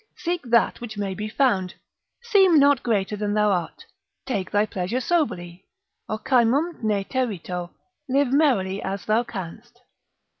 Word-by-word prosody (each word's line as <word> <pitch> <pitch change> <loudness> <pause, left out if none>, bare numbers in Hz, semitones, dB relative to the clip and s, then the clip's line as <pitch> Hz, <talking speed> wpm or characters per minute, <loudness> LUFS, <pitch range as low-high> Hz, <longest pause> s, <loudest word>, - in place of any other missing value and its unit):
Seek 350 0 -2
that 235 -1 +2
which 220 -3 -7
may 200 -2 -2
be 210 +2 -5
found. 200 -8 +1 0.5
Seem 390 -8 +5
not 285 -2 +5
greater 210 -3 0
than 205 0 -2
thou 210 -1 +3
art. 175 -4 -3 0.4
Take 200 -8 -2
thy 205 +1 +2
pleasure 195 +4 -3
soberly. 190 - -2 0.4
Ocymum 260 +8 +1
ne 210 -3 0
terito. 185 -8 -3 0.4
Live 270 0 +2
merrily 205 -11 +2
as 195 0 -4
thou 215 +2 +2
canst. 230 +4 -9
215 Hz, 140 wpm, -24 LUFS, 195-265 Hz, 0.5 s, Seem